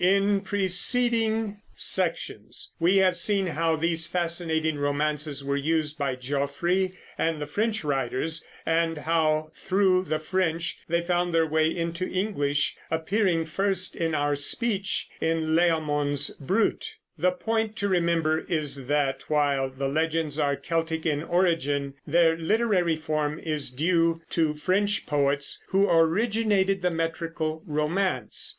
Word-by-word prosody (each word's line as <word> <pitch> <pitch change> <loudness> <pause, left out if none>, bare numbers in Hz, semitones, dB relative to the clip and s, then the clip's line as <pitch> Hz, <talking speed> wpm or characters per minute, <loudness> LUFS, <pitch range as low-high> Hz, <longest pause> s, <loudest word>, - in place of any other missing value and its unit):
In 200 +2 +3
preceding 220 +2 +1
sections - - -1
we 175 +4 +3
have 185 -1 +4
seen 195 +3 +3
how 165 -1 0
these 165 0 +1
fascinating 165 -3 -1
romances 145 0 -1
were 140 0 -1
used 155 +1 -1
by 135 -2 -1
Geoffrey 145 +8 -1 0.3
and 160 -1 0
the 150 - -3
French 215 +7 -1
writers, 145 +3 -1 0.2
and 165 0 +1
how, 155 0 0
through 185 0 +1
the 155 - -1
French, 170 +1 -1
they 170 +1 +1
found 175 -1 0
their 165 0 +4
way 155 0 +2
into 170 +2 -3
English, 145 -8 0
appearing 165 +1 +1
first 190 +3 0
in 165 -2 -1
our 145 0 +1
speech 200 +7 0
in 160 -1 0
Layamon's 150 -4 +1
Brut. 225 - -1 0.2
The 275 - +3
point 225 -4 -1
to 200 - -1
remember 170 -4 +1
is 150 -7 -2
that, 140 -2 0
while 140 -3 +1
the 135 +1 -3
legends 160 +1 -1
are 140 -1 +1
Celtic 165 0 -2
in 150 -3 0
origin, 160 -6 0
their 165 +1 +4
literary 180 -1 +1
form 155 -1 -2
is 155 -5 -2
due 165 +4 +1
to 160 -2 +1
French 200 +6 0
poets, 140 -1 0
who 195 +1 +3
originated 195 +3 +2
the 180 - +2
metrical 165 -1 -3
romance. 155 +6 -1
165 Hz, 130 wpm, -26 LUFS, 150-185 Hz, 0.3 s, have